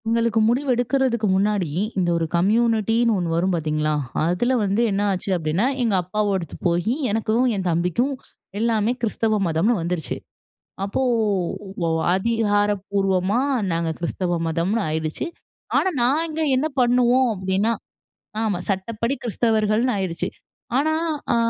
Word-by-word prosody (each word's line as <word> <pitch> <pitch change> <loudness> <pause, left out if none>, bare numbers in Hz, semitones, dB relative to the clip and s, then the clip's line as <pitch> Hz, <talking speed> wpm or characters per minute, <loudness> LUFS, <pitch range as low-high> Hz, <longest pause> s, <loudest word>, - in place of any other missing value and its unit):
எங்களுக்கு 230 0 +2
முடிவெடுக்கிறதுக்கு 245 -2 +1
முன்னாடி, 195 -3 +1 0.3
இந்த 180 -2 +1
ஒரு 165 - 0
கம்யூனிட்டின்னு 225 +4 +2
ஒண்ணு 170 -3 -1
வரும் 175 +3 +1
பார்த்தீங்களா, 155 -1 -1 0.3
அதுல 180 +10 +1
வந்து 200 +2 +1
என்ன 195 +1 0
ஆச்சு 190 +1 -3
அப்படின்னா, 165 +6 0 0.2
எங்க 225 -3 +1
அப்பாவோடது 195 -2 -2
போயி 175 +6 +1 0.2
எனக்கும், 225 +3 +1
என் 190 -2 -2
தம்பிக்கும் 180 - 0 0.5
எல்லாமே 225 0 +1
கிறிஸ்தவ 225 -1 0
மதம்னு 170 +9 +2
வந்துருச்சு. 165 -6 -3 0.7
அப்போ 200 +6 -1 0.8
வ - - +1 0.3
அதிகாரப்பூர்வமா 205 -1 +1 0.3
நாங்க 165 0 0
கிறிஸ்தவ 175 +1 -1
மதம்னு 170 +8 0
ஆயிருச்சு. 155 - -2 0.5
ஆனா 380 - +2
நாங்க 310 +5 +1 0.2
என்ன 275 +4 +1
பண்ணுவோம் 250 +1 +4
அப்படின்னா 190 +3 0 0.7
ஆமா 210 -5 0
சட்டப்படி 220 +6 -1
கிறிஸ்தவர்கள்ன்னு 225 +1 +1
ஆயிருச்சு. 180 -2 -2 0.5
ஆனா, 310 +3 +2 0.4
ஆ, - - +3
205 Hz, 115 wpm, -22 LUFS, 180-235 Hz, 0.8 s, பண்ணுவோம்